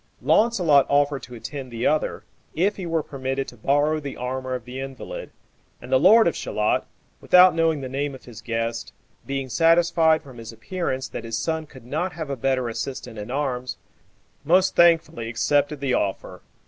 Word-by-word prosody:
Launcelot 180 - +4
offered 145 -1 +2
to 125 - -10
attend 130 +3 -7
the 115 0 -4
other, 155 0 0 0.3
if 195 +6 +1
he 185 -3 -5
were 165 -2 0
permitted 135 -1 -4
to - - -14
borrow 145 +6 +1
the 140 -2 -7
armor 130 +1 -3
of 125 -2 -7
the 125 +1 -7
invalid, 135 - -7 0.5
and - - -11
the - - +5
lord 225 -1 +6
of 170 - 0
Shalott, 105 0 -1 0.3
without 180 0 +6
knowing 165 -3 +1
the 130 - -5
name 140 +1 -3
of 130 - -15
his 115 -3 -11
guest, 115 0 -3 0.3
being 135 -1 -3
satisfied 165 +1 +3
from 130 -5 -13
his 115 0 -8
appearance 130 - -4
that 115 - -6
his 115 0 -3
son 160 +6 -2
could 130 -5 -15
not 165 +8 -2
have 155 -4 -5
a - - -1
better 130 0 0
assistant 115 -1 -5
in 105 - -7
arms, 125 -2 -3 0.7
most 185 +3 +3
thankfully 165 -9 +3
accepted 145 +5 0
the 135 -3 0
offer. 100 -4 -2
140 Hz, 180 wpm, -23 LUFS, 125-160 Hz, 0.7 s, lord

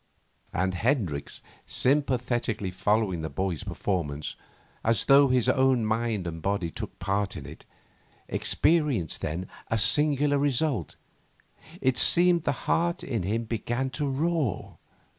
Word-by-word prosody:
And 95 +1 0
Hendricks, 95 - -1 0.2
sympathetically 125 -7 0
following 105 -2 0
the 80 - -4
boy's 90 +1 -2
performance 75 -7 -3 0.5
as 115 -1 +2
though 140 0 +6
his 125 -3 +2
own 130 -3 +3
mind 110 -3 -1
and 80 -1 -5
body 95 -3 -1
took - - -7
part 100 +1 -1
in - - -8
it, - - -11 0.6
experienced 150 - +1
then 85 +5 -3 0.2
a 115 - 0
singular 145 +5 +3
result: 140 - 0 0.9
it 130 -1 +2
seemed 175 -1 +5
the - - +2
heart 170 +1 +1
in 115 -6 -2
him 110 +6 -1
began 120 +3 -2
to 140 +3 -2
roar. 150 - -1
115 Hz, 125 wpm, -27 LUFS, 95-140 Hz, 0.9 s, though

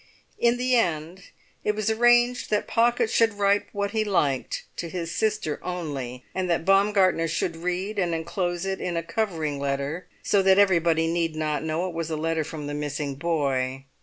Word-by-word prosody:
In 235 0 +3
the 250 +1 +2
end 175 -3 -1 0.4
it 210 - +1
was 215 +1 0
arranged 240 +2 +3
that 210 -1 +1
Pocket 235 0 +2
should 225 -1 +2
write 200 0 +2
what 200 0 -2
he 220 0 +1
liked 150 -10 0
to 170 - -4
his 170 -1 -4
sister 215 -8 -1
only, 140 -8 -5
and 185 -1 -2
that 165 -1 0
Baumgartner 195 -3 +3
should 165 +1 -1
read 180 +5 -3
and 175 -3 +1
enclose 175 +2 -2
it 195 0 -3
in 175 -2 -2
a 165 - -1
covering 165 -6 -2
letter, 140 +5 -2 0.2
so 200 - +3
that 190 0 +5
everybody 170 -5 +4
need 165 -1 0
not 155 -2 -1
know 160 +3 -1
it 180 - -6
was 165 -1 -3
a 160 - -2
letter 160 0 0
from 150 -1 -7
the 145 - -4
missing 145 -1 -3
boy. 135 -4 -1
170 Hz, 185 wpm, -25 LUFS, 155-200 Hz, 0.4 s, that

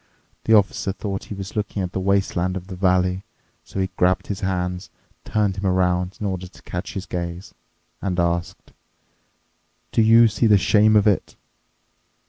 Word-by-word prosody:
The 110 - +5
Officer 100 -1 +2
thought 100 0 -5
he 105 - -7
was 95 0 -7
looking 105 -2 -2
at 90 - -4
the - - -3
wasteland 95 -1 0
of 90 - -8
the 95 - -6
valley. 90 0 +1 0.4
So - - -7
he 95 0 -1
grabbed 90 +1 +2
his 100 -1 -4
hands, 90 -1 -2 0.4
turned 105 -3 0
him 95 - -3
around 90 0 +1
in 105 - -3
order 95 -2 -3
to 90 - -18
catch - - -6
his 95 - -4
gaze, 85 +1 -5 0.5
and 90 -2 -2
asked, 85 0 -2 1.2
"Do - - +3
you 115 +1 +7
see 115 +2 +1
the 105 -2 +6
shame 105 +2 +4
of 105 - +5
it?" 105 -3 +1
95 Hz, 170 wpm, -22 LUFS, 90-100 Hz, 1.2 s, you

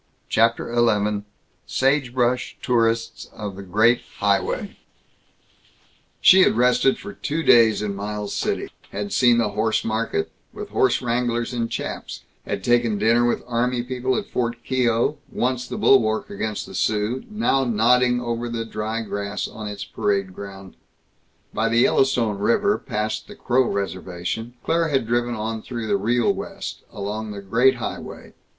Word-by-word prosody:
CHAPTER 115 +1 +2
XI 105 -3 +2 0.5
SAGEBRUSH 125 -2 +1
TOURISTS 115 -1 0
OF 105 -3 -6
THE 100 - -8
GREAT 110 +6 +3 0.2
HIGHWAY 100 -1 0 1.4
She 190 - +7
had 150 - +4
rested 125 +2 +3
for 205 +1 -8
two 160 -2 -3
days 110 -6 +5
in 105 -1 -2
Miles 105 +1 -4
City; - - -2 0.2
had 100 0 -4
seen 120 -2 +5
the 115 -3 +2
horse 110 +2 0
market, 110 -7 -1 0.2
with - - -7
horse - - +2
wranglers 120 0 -1
in 115 -1 -1
chaps; - - -5 0.2
had 100 -2 -3
taken 120 -2 +2
dinner 115 +3 +3
with 120 - -1
army 125 0 0
people 130 0 -1
at - - -2
Fort 120 -1 -3
Keogh, 125 +1 +1
once 125 0 -1
the - - -5
bulwark 110 -5 +3
against 105 +1 -3
the - - -11
Sioux, 105 +6 0
now 210 -11 +1
nodding 125 +1 +3
over 120 0 -3
the 115 -1 -3
dry 110 +1 -3
grass 100 -1 -3
on 110 -1 -7
its 100 0 -6
parade 100 -2 -1
ground. 95 -1 -10 0.8
By 115 +1 +1
the 115 +1 +3
Yellowstone 120 -7 +2
River, 200 - +2
past 105 +1 -3
the - - -11
Crow 125 0 +1
reservation, 95 +4 -4
Claire 165 0 +1
had 135 -5 +1
driven 120 +1 0
on 110 0 -3
through 120 -1 -5
the 105 -2 +1
Real 115 +4 +2
West, - - -6
along 105 +2 -4
the 100 -1 -6
Great 120 +7 +3
Highway. - - -7
115 Hz, 150 wpm, -23 LUFS, 105-125 Hz, 1.4 s, She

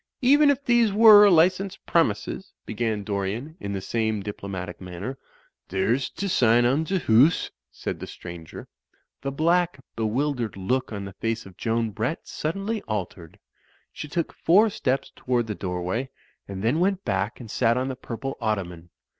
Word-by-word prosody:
"Even 285 +3 +6
if 280 0 0
these 240 -3 +4
were 210 -1 +8
licensed 185 +3 +2
premises," 170 +3 0
began 110 -2 -2
Dor 100 -1 -2
ian, 125 +11 -5
in 100 -7 -4
the 95 - -3
same 110 0 -1
diplomatic 95 -3 -6
manner. 95 +8 -6 0.5
"There's 110 +8 0
t'sign 120 - +2
on 140 +6 +2
t'hoose," 155 - +3 0.2
said - - -5
the - - -7
stranger. 85 -3 -9 0.5
The 140 - -3
black, 170 +2 +1 0.2
bewildered 120 0 -1
look 125 +8 -1
on 100 -2 -5
the 100 - -8
face 115 +3 -3
of 95 -2 -13
Joan 115 -1 -1
Brett 115 - -3
suddenly 195 +7 -3
altered. 90 -5 -5 0.6
She 150 - -7
took 165 +2 -2
four 205 +6 +4
steps 135 -7 -1
toward 125 -2 0
the 110 - -3
doorway, 95 +7 -3 0.4
and 95 0 -6
then 125 +8 +2
went 195 +1 0
back 100 +1 -1
and 115 -4 -9
sat 115 -1 +2
on 130 +1 -1
the 130 - -3
pur 115 -2 -7
ple 135 +2 -5
ottoman. 90 -6 -3
120 Hz, 160 wpm, -25 LUFS, 100-165 Hz, 0.6 s, were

